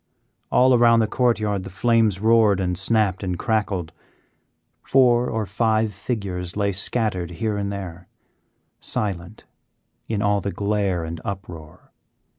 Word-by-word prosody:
All 130 +1 +5
around 120 -1 +5
the 110 - +3
court 120 0 +1
yard 105 -2 -1
the 95 - -8
flames 110 -1 +2
roared 110 -2 +4
and 90 -1 -1
snapped 95 0 +1
and 90 -3 -3
crackled. 100 -7 -1 0.9
Four 125 -2 +3
or 110 -2 -2
five 110 +1 0
figures 95 -4 -4
lay 100 -1 +1
scattered 95 -2 -2
here 105 +5 -2
and 100 -1 -2
there, 90 -3 -7 0.7
silent 100 0 -4 0.6
in 105 -3 -1
all 100 0 +2
the 100 - -3
glare 100 -4 -1
and 80 0 -6
uproar. 90 -6 -8
100 Hz, 135 wpm, -22 LUFS, 95-110 Hz, 0.9 s, All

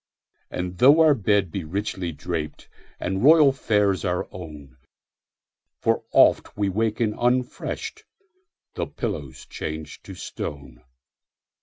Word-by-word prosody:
And 90 0 -5
tho 140 +5 +7
our 155 -2 +6
bed 100 - +1
be 95 - -4
richly 95 +1 -3
drapedAnd 85 +4 -5
royal 150 -1 +7
fares 105 -7 +1
our 90 -2 -1
own, 75 -7 -10 1.0
For - - 0
oft - - +4
we 100 -1 +1
waken 110 +2 0
unrefreshed—The 340 - -4
pillow's 65 -3 -5
changed 80 0 -7
to - - -9
stone! 70 -4 -7
95 Hz, 105 wpm, -24 LUFS, 80-120 Hz, 1.0 s, tho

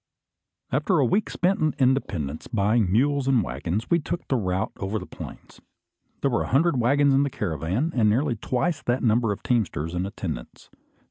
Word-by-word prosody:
After 150 +7 +1
a 140 - +4
week 200 - +1
spent 185 +2 +1
in 155 -1 +1
Independence 100 - 0
buying 105 -1 +1
mules 140 +5 +2
and 130 -5 +3
waggons, 85 - -3
we 170 - +4
took 170 +2 -5
the 135 - +2
route 95 -2 -1
over 100 +3 -2
the 90 - -6
plains. - - -11 0.6
There 140 - +1
were 120 - +1
a - - -2
hundred 140 +1 +3
waggons 140 +4 +3
in 135 - +4
the 140 - +1
caravan, 95 - -2
and 110 -4 +4
nearly 125 +4 +1
twice 145 +8 -1
that 120 +2 -1
number 115 -1 +2
of 100 - -5
teamsters 85 - -1
and 90 +2 -1
attendants. - - -7
120 Hz, 185 wpm, -25 LUFS, 100-140 Hz, 0.6 s, a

